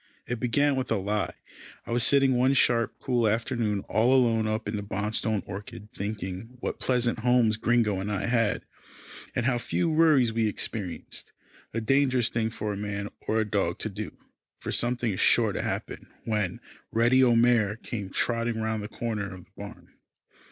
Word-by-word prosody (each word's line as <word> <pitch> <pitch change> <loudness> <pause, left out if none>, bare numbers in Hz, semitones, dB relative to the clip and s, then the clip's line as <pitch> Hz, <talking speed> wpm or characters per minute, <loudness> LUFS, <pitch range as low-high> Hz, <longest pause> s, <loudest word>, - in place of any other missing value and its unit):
It 120 -1 -3
began 140 +4 +2
with 130 -3 -3
a - - +4
lie. 105 +1 -1 0.5
I - - -7
was 120 0 +2
sitting 135 +1 +4
one 130 +2 +3
sharp, 115 -3 +3
cool 120 -3 +1
afternoon 110 -2 0
all 115 +7 +2
alone 115 -4 +3
up 110 0 -2
in 105 - -2
the 105 - -2
Bonstone 105 +1 -2
orchard, 105 +1 -8
thinking 100 +3 -5
what - - -4
pleasant 125 -2 +1
homes 120 -2 +3
Gringo 110 -3 +1
and 100 +2 -3
I 100 - -1
had, 115 -3 +1 0.7
and 120 - 0
how 125 -1 +2
few 165 +7 0
worries 155 -7 +4
we 115 -1 +1
experienced 100 -3 -4 0.4
a 115 - -2
dangerous 130 0 +2
thing 115 -1 -1
for 105 -2 -3
dog - - -6
or 105 +1 -3
man 100 -4 0
to 110 - -2
do, 105 0 -7 0.4
for - - -5
something 120 -1 +1
is 95 - -4
sure - - +4
to - - -2
happen - - -4 0.2
when 105 -5 -1 0.3
Reddy 120 +3 +4
O'Mare 115 -4 +4
came 105 -3 -6
trotting 115 +2 0
round 110 -1 -1
the 105 - -5
corner 105 -3 -3
of 95 -2 -10
the 95 - -35
barn. 100 0 -10
110 Hz, 175 wpm, -27 LUFS, 105-120 Hz, 0.7 s, a